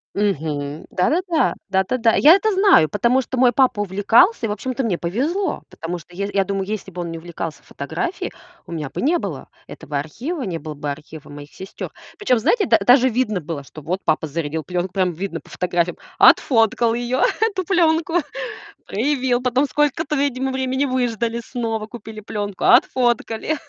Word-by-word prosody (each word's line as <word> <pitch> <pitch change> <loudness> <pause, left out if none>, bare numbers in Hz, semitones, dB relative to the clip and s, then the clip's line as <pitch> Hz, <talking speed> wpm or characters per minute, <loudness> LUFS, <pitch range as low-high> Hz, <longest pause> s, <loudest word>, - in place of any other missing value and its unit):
Мгм. 155 -7 -2
Да-да-да. 330 - +1 0.2
Да-да-да. 220 +5 +2
Я 305 +3 +8
это 430 +2 +1
знаю, 380 - +5
потому 235 +7 +2
что 260 0 -5
мой 245 -1 +5
папа 250 -4 +3
увлекался 205 - +3
и, - - -6
общем-то, 255 +6 -3
мне 205 -7 0
повезло, 295 - -1
потому 170 +2 -5
что 175 +2 -17
я 200 - -2
ес 205 - -5
я 195 -1 +3
думаю, 195 0 -2
если 210 -2 -4
бы 180 -1 -6
он 170 - -4
не 165 - -6
увлекался 165 -2 -6
фотографией, 160 - -4 0.3
у - - -12
меня 155 -4 -4
бы - - -5
не 335 +5 +3
было - - -6 0.2
этого 145 -2 -5
архива, 260 - -5
не 175 -5 -3
было 155 -2 -7
бы 145 0 -5
архива 150 +1 -8
моих 145 0 -11
сестёр. 190 +1 -8 0.3
Причём, 255 - +2
знаете, 405 - +2
да - - +5
даже 255 +1 +5
видно 225 -4 0
было, 155 -3 -6
что 155 +3 -12
вот 180 +6 -2
папа 155 0 +1
зарядил 155 0 -3
плёнку, 180 0 -3
прям 185 -2 +1
видно 175 -1 -5
по - - -20
фотографиям, 175 -1 -1 0.2
отфоткал 225 -1 +4
её, 245 +2 -1 0.2
эту 395 -4 +1
плёнку, 330 -2 +2 0.7
проявил, 250 +1 0
потом 255 +3 +2
сколько-то, 295 +2 0
видимо, 265 -1 0
времени 260 +1 -1
выждали, 235 -3 -1
снова 225 -3 -3
купили 220 -2 -9
плёнку, 205 -2 -4
отфоткали. 245 +1 +3
220 Hz, 175 wpm, -21 LUFS, 175-260 Hz, 0.7 s, Я